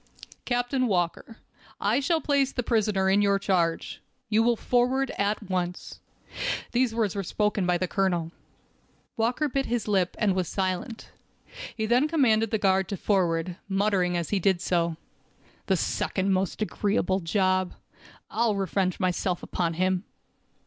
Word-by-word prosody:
"Captain 245 +1 0
Walker, 185 +3 -1 0.4
I 220 +6 +2
shall 320 +3 +1
place 280 -2 +2
the 245 - -2
prisoner 210 -5 +1
in 195 +2 +4
your 200 -1 +3
charge. 180 -4 -1 0.3
You 220 +1 +3
will 235 +1 +3
forward 250 +3 +1
at 205 +1 -1
once." 180 -1 -3 0.7
These 245 -2 +1
words 220 -5 +1
were 200 - -1
spoken 210 0 0
by 180 0 +3
the 185 +1 -1
colonel. 175 -4 0 0.8
Walker 245 +7 +1
bit 275 0 -1
his 240 -2 -1
lip, 190 -4 +1
and 210 -4 +2
was 185 -2 -1
silent. 190 +5 -3 0.7
He 220 - 0
then 245 +6 +3
commanded 230 -9 +3
the 220 - +1
guard 190 -2 +2
to 200 - -3
forward, 175 -3 0
muttering 195 -3 +1
as 170 -2 -3
he 200 - +2
did 190 -1 +2
so: 170 -2 0 0.7
"The - - +2
second 195 0 0
most 190 +3 -1
agreeable 200 -2 0
job. 185 +1 +1 0.6
I'll 225 -2 +1
revenge 190 -1 -1
myself 180 -1 -1
upon 170 -2 -2
him." 185 +1 +1
200 Hz, 150 wpm, -26 LUFS, 185-225 Hz, 0.8 s, in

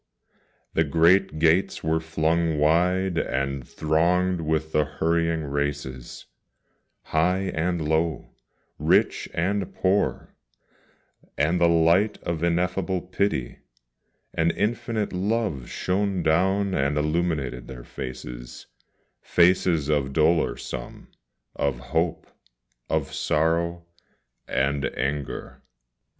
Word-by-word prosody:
the 80 - +3
great 85 +3 +3
gates 80 +4 +2
were 80 0 +1
flung 80 0 0
wide, 90 +4 +2
and 70 -1 -2
thronged 85 +3 +1
with 80 0 -1
the 75 - +3
hurrying 80 +2 0
races 70 -3 -4 0.8
High 90 +4 +1
and 80 -1 -1
low, 80 -1 0 0.5
rich - - +2
and 95 +3 -1
poor 95 +2 0 1.0
and 80 +5 +1
the 85 - +5
light 85 +5 +3
of 85 -2 -3
ineffable 90 +2 0
pity, 90 -8 -2 0.7
And 80 +1 +2
infinite 115 -1 -1
love 95 - -1
shone 95 -1 -1
down 95 +5 +2
and 70 -1 +1
illumined 75 -5 -1
their 65 -2 -9
faces, - - -8 0.6
Faces 85 -3 +3
of 70 -3 0
dolor 80 +2 +2
some, - - -8 0.5
of 70 -3 0 0.2
hope, 80 0 0 0.6
of - - -1
sorrow, 85 +2 0 0.6
and 70 +1 0
anger. 70 0 -3
80 Hz, 100 wpm, -25 LUFS, 75-90 Hz, 1.0 s, the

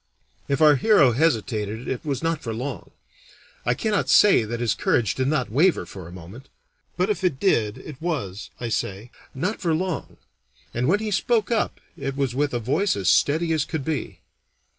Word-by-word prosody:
If 140 +2 0
our 150 -2 +7
hero 150 - +5
hesitated 115 -5 0
it 130 - -3
was 145 -1 -3
not 165 -1 0
for 115 -5 -4
long. 125 -3 -5 0.8
I 120 - +3
cannot 210 - 0
say 205 - +6
that 115 +2 -4
his 120 -3 +1
courage 110 -5 +1
did 130 0 -1
not 140 -6 0
waver 165 +9 +3
for 95 -4 -10
a - - -11
moment; 95 +9 -11 0.5
but 185 +3 +2
if 205 - -3
it 175 -8 +1
did, 115 - +1
it 135 +1 -10
was, 115 - -3
I 120 - -3
say, 105 +2 -3 0.2
not 180 +11 -2
for 165 -3 +1
long, 180 -3 -3 0.6
and 120 +2 0
when 200 +7 +2
he 215 -1 -3
spoke 220 +3 +1
up 225 - 0 0.2
it 135 0 -4
was 135 -3 0
with 145 +2 0
a 120 - -1
voice 150 - +1
as 100 -3 0
steady 155 - +3
as 155 -2 +1
could 145 -3 -4
be. 160 -3 -4
135 Hz, 190 wpm, -24 LUFS, 115-165 Hz, 0.8 s, our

